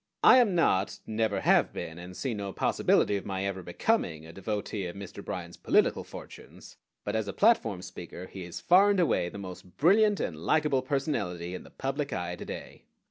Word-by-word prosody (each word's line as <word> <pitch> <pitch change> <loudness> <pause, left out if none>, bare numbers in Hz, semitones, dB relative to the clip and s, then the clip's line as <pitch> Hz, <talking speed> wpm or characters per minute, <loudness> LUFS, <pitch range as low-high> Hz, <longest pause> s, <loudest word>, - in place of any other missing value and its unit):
I - - +9
am 225 -7 +4
not, 100 - +2
never 110 -1 0
have - - +4
been, 80 +1 -6
and 90 0 -9
see 120 +6 -2
no 100 -2 -4
possibility 100 - +2
of 100 - -7
my 95 -1 -2
ever 95 -1 -3
becoming, 90 - -1
a 80 - -11
devotee 100 0 -3
of 85 - -7
Mr. 100 -1 -8
Bryan's - - -6
political - - +2
fortunes; - - -12 0.3
but - - -3
as 110 -1 -1
a - - -4
platform 115 - +3
speaker 90 0 -8
he 95 0 -8
is 85 -1 -7
far 190 +3 +5
and 200 -2 +2
away 145 - +2
the 100 - -9
most 90 -2 -9
brilliant 205 +5 +4
and 80 - -3
likable 150 - +2
personality 105 - -2
in 90 - -5
the - - -14
public 140 +2 -3
eye 90 0 -3
to - - -8
day. - - -8
100 Hz, 195 wpm, -29 LUFS, 90-145 Hz, 0.3 s, I